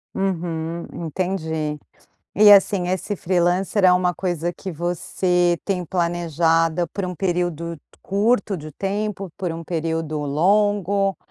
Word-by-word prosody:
Uhum, 170 -3 -2 0.2
entendi. 160 -3 -2 0.6
E, 210 0 +7
assim, 195 -2 +5
esse 190 +3 -2
freelancer 185 +2 +1
é 180 - +7
uma 180 0 +2
coisa 175 -1 -2
que 190 +1 -7
você 175 +1 0
tem 185 -3 -1
planejada 170 -1 +1
por 195 +3 -4
um 180 0 -4
período 170 -3 -2 0.2
curto 205 0 +1
de 155 -1 -9
tempo, 200 +1 -3
por 180 -4 -3
um 165 0 -6
período 160 -2 -2
longo? 195 +5 +2
175 Hz, 120 wpm, -22 LUFS, 165-195 Hz, 0.6 s, E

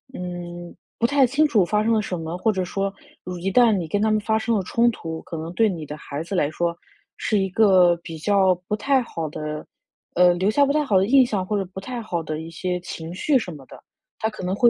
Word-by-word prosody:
嗯， 175 -1 -7 0.2
不 235 - +1
太 280 0 +4
清 280 +5 +2
楚 220 -9 +3
发 210 +4 +1
生 230 +1 +2
了 220 - +2
什 185 -3 -4
么， 165 +1 -4
或 220 +4 +2
者 190 -3 -2
说 195 +2 -2 0.5
一 195 +2 -1
旦 240 +2 +5
你 185 -6 -1
跟 205 +6 -1
他 220 - +3
们 215 - +3
发 220 +1 0
生 230 +1 0
了 195 - -1
冲 235 +6 +2
突， 165 -6 -6
可 165 - -7
能 160 +2 -6
对 220 +3 +3
你 165 -5 -5
的 150 - -7
孩 150 0 -6
子 170 - -7
来 145 -5 +2
说 170 +1 -1 0.4
是 215 - 0
一 195 -1 +1
个 185 -4 +5
比 165 -2 -7
较 190 +2 +3
不 210 - 0
太 270 +5 +2
好 165 -8 -5
的 155 0 -5 0.5
呃， 180 0 +6
留 185 +3 +1
下 285 +6 +4
不 280 - +1
太 305 0 +2
好 215 -9 +2
的 190 - +3
印 270 +3 +6
象， 200 -6 -2
或 210 - -2
者 195 - 0
不 190 - -5
太 245 +4 -5
好 175 -6 -3
的 155 0 -4
一 160 - -8
些 180 +2 -2
情 165 -1 -7
绪 275 +9 +2
什 185 - -6
么 145 -3 -11
的， - - -13 0.4
他 220 - 0
可 200 - -9
能 185 +1 -1
会 240 +3 +5
190 Hz, 280 characters per minute, -23 LUFS, 175-220 Hz, 0.5 s, 呃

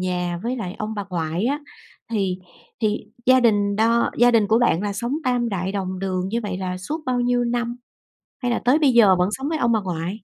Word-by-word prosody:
nhà 180 -1 -2
với 250 +2 -2
lại 185 -5 -5
ông 215 +1 -4
bà 205 -2 -4
ngoại 165 +2 -2
á, 285 +4 0 0.5
thì 190 -4 0 0.4
thì 215 0 0 0.2
gia 255 0 +6
đình 205 -3 +2
đo 230 +2 +2
gia 245 +1 +6
đình 225 -3 +3
của 225 - +4
bạn 210 -6 +2
là 205 -1 -2
sống 235 +6 -3
tam 245 -2 +1
đại 190 -1 -2
đồng 185 -2 -3
đường 185 -1 -2
như 230 +3 -1
vậy 195 -3 -4
là 185 -1 -3
suốt 300 - -4
bao 250 -1 +1
nhiêu 245 0 +1
năm? 240 0 -2 0.7
Hay 245 - +1
là - - -1
tới 275 +6 +4
bây 285 -4 +4
giờ 205 -6 +6
vẫn 180 +2 +1
sống 270 +6 -3
với 320 - -1
ông 240 -4 +1
bà 220 - +3
ngoại? 175 -2 -3
215 Hz, 235 wpm, -22 LUFS, 185-240 Hz, 0.7 s, gia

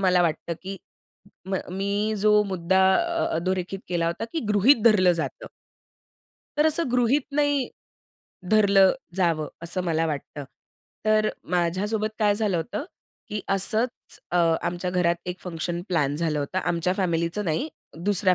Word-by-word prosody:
मला 180 -2 +4
वाटतं, 170 0 -1
की 195 +1 -5 0.7
म - - 0 0.2
मी 205 +2 0
जो 210 +1 +5
मुद्दा 190 -1 +1 0.2
अ 340 -1 0
अधोरेखित 185 +2 -2
केला 170 -2 0
होता, 170 +6 -2
की 325 - -1
गृहीत 215 +4 +5
धरलं 185 -6 +6
जातं. 170 - -4 1.1
तर 300 - +4
असं 315 -1 +1
गृहीत 250 +3 +3
नाही, 290 -2 +1 0.8
धरलं 200 -3 +5 0.2
जावं, 165 -5 +1
असं 175 +2 -3
मला 165 -1 +1
वाटतं. 145 -1 -5 0.6
तर 215 0 +3 0.2
माझ्या 180 +2 +1
सोबत 215 -1 0
काय 210 -2 +3
झालं 205 -4 0
होतं, 200 - -3 0.4
की 210 0 -3
असंच 215 +5 -1
अ, 180 - 0 0.3
आमच्या 175 +1 -2
घरात 175 -1 +2
एक 180 0 -4
फंक्शन 170 0 -4
प्लॅन 145 -5 +1
झालं 155 -2 0
होतं 145 +6 -2
आमच्या 175 0 0
फॅमिलीचं 170 +1 0
नाही, 175 - -1 0.4
दुसऱ्या 195 -2 +4
190 Hz, 145 wpm, -25 LUFS, 170-215 Hz, 1.1 s, धरलं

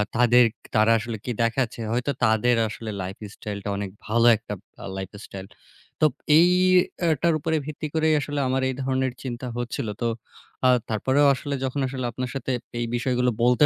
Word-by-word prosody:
তাদের 120 0 +6 0.3
তারা 110 +1 +5
আসলে 115 0 -5
কি 125 - -2
দেখাচ্ছে। 115 0 -1
হয়তো 125 +4 0
তাদের 110 +2 +3
আসলে 110 0 -6
লাইফস্টাইলটা 100 +1 -6
অনেক 100 -1 -3 0.2
ভালো 115 +2 +2
একটা 110 -1 -7 0.4
লাইফস্টাইল। 95 0 -8 0.5
তো 155 - +6 0.3
এইটার 175 -2 +3
উপরে 160 +2 -1
ভিত্তি 155 +1 -5
করেই 160 0 +2
আসলে 145 0 -3
আমার 130 +1 +1
এই 130 - -3
ধরনের 130 -1 0
চিন্তা 125 0 -5
হচ্ছিল। 120 -2 -3
তো 120 - +1 0.6
আ - - +6 0.2
তারপরেও 130 +6 +2
আসলে 140 +2 -3
যখন 130 +2 -2
আসলে 130 -1 -4
আপনার 125 +1 -4
সাথে 130 0 -3 0.3
এই 120 - 0
বিষয়গুলো 125 0 +1
বলতে 125 +4 +5
125 Hz, 155 wpm, -24 LUFS, 115-140 Hz, 0.6 s, তাদের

